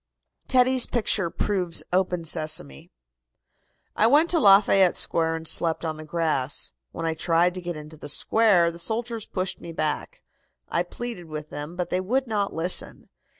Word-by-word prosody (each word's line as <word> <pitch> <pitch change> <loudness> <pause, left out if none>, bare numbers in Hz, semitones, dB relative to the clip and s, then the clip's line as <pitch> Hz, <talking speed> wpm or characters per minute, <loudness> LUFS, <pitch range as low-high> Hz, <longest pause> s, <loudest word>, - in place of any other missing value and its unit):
TEDDY'S 255 0 +4
PICTURE 210 -6 0
PROVES 180 -3 -1
"OPEN 180 -2 0
SESAME." 155 - -2 1.1
"I 220 - +4
went 300 +7 +4
to 340 - +3
Lafayette 195 - +5
Square 165 0 0
and 160 0 -7
slept 165 +1 0
on 160 -1 -3
the 155 - -9
grass. 155 -4 -1 0.2
When 165 - -5
I 165 - 0
tried 170 +2 +1
to 185 - -6
get 175 -2 -5
into 150 +1 -11
the 145 - -8
square 180 0 +3
the 170 - -11
soldiers 225 +3 -3
pushed 185 -1 -3
me 170 - -8
back. 165 - -3 0.5
I - - 0
pleaded 235 -7 -5
with 155 -1 -8
them, 150 +4 -6
but 180 -1 -4
they 185 - 0
would 255 +8 0
not 210 -4 -1
listen. 170 +3 0
175 Hz, 165 wpm, -24 LUFS, 160-210 Hz, 1.1 s, Lafayette